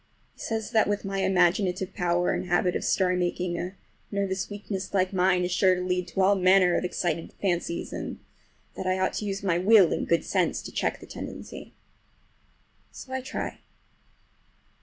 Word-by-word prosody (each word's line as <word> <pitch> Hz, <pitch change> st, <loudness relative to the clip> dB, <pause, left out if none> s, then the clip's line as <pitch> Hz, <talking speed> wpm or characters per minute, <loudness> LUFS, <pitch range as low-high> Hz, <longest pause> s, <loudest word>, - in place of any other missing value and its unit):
He -, -, -28 dB
says 225 Hz, 0 st, -3 dB
that 220 Hz, -2 st, +3 dB
with 205 Hz, 0 st, -1 dB
my 195 Hz, 0 st, -2 dB
imaginative 190 Hz, 0 st, +2 dB
power 175 Hz, -2 st, +1 dB
and -, -, -3 dB
habit 180 Hz, 0 st, +2 dB
of -, -, -2 dB
story 185 Hz, -1 st, +2 dB
making 175 Hz, -1 st, -1 dB
a 180 Hz, +3 st, -5 dB, 0.3 s
nervous 195 Hz, -2 st, -2 dB
weakness 200 Hz, -1 st, -5 dB
like 185 Hz, 0 st, +1 dB
mine 180 Hz, -1 st, +3 dB
is 180 Hz, -, -3 dB
sure 185 Hz, +1 st, +4 dB
to 180 Hz, -, -3 dB
lead 180 Hz, 0 st, -1 dB
to 185 Hz, +2 st, -2 dB
all 190 Hz, +2 st, +5 dB
manner 185 Hz, -1 st, +4 dB
of -, -, 0 dB
excited 175 Hz, -2 st, -2 dB
fancies, 175 Hz, -3 st, -2 dB
and -, -, -5 dB, 0.6 s
that 185 Hz, -, -4 dB
I 185 Hz, 0 st, +1 dB
ought 185 Hz, 0 st, 0 dB
to 210 Hz, -, -3 dB
use 195 Hz, -1 st, -3 dB
my 175 Hz, -3 st, +1 dB
will 195 Hz, -2 st, +6 dB
and -, -, -2 dB
good 170 Hz, -, +2 dB
sense -, -, 0 dB
to -, -, -8 dB
check -, -, -1 dB
the -, -, -10 dB
tendency. -, -, -9 dB, 1.2 s
So 260 Hz, -, -10 dB
I 260 Hz, -, -1 dB
try. 265 Hz, +4 st, -5 dB
185 Hz, 180 wpm, -27 LUFS, 180-195 Hz, 1.2 s, will